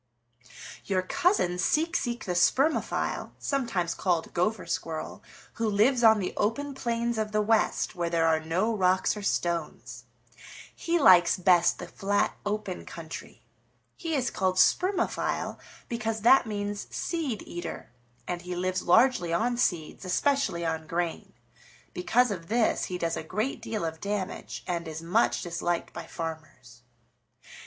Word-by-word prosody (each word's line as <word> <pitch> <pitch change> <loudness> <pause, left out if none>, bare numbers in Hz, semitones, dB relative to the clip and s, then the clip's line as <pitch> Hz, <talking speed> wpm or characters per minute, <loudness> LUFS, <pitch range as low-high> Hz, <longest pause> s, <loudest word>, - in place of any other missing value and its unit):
"Your 185 -2 0
cousin, 185 - +1
Seek 320 - +1
Seek 240 -2 -2
the 185 - -2
Spermophile, 265 - +1
sometimes 230 - -1
called 175 -3 -1
Gopher 185 +4 0
Squirrel, 160 -1 -4 0.3
who 230 -1 -1
lives 235 +5 +3
on 220 -1 +7
the 190 -3 -3
open 275 +7 -1
plains 235 -3 -1
of 215 -1 -2
the 215 - +2
West 220 +1 +1
where 170 -1 -2
there 165 -1 +2
are 160 -1 +3
no 180 +8 0
rocks 185 0 +2
or 210 - -6
stones. 170 -5 -2 0.7
He 340 +1 0
likes 180 - +6
best 175 -1 +4
the - - -7
flat, 200 +1 0
open 205 -3 -3
country. 165 -1 -9 0.5
He 330 -3 -3
is 260 -3 0
called 185 -1 0
Spermophile 365 - +1 0.3
because 225 -2 -3
that 245 +2 +6
means 205 -1 -4
seed 300 - -3
eater, 175 -7 -7 0.4
and 175 -1 -3
he 180 0 -5
lives 185 +1 -1
largely 225 -2 +4
on 235 +8 +1
seeds, 175 -10 -1
especially 185 -2 0
on 160 -1 -2
grain. 170 0 -3 0.6
Because 235 +6 +2
of 170 -4 -5
this 225 +1 +1
he 180 - -4
does 165 -2 -1
a - - -3
great 215 - -3
deal 215 -6 -3
of 160 0 -5
damage 200 -2 -4
and 170 -2 -3
is 160 +1 -6
much 190 +8 +1
disliked 175 -1 -2
by - - -7
farmers. 155 -8 -8
190 Hz, 145 wpm, -28 LUFS, 170-230 Hz, 0.7 s, on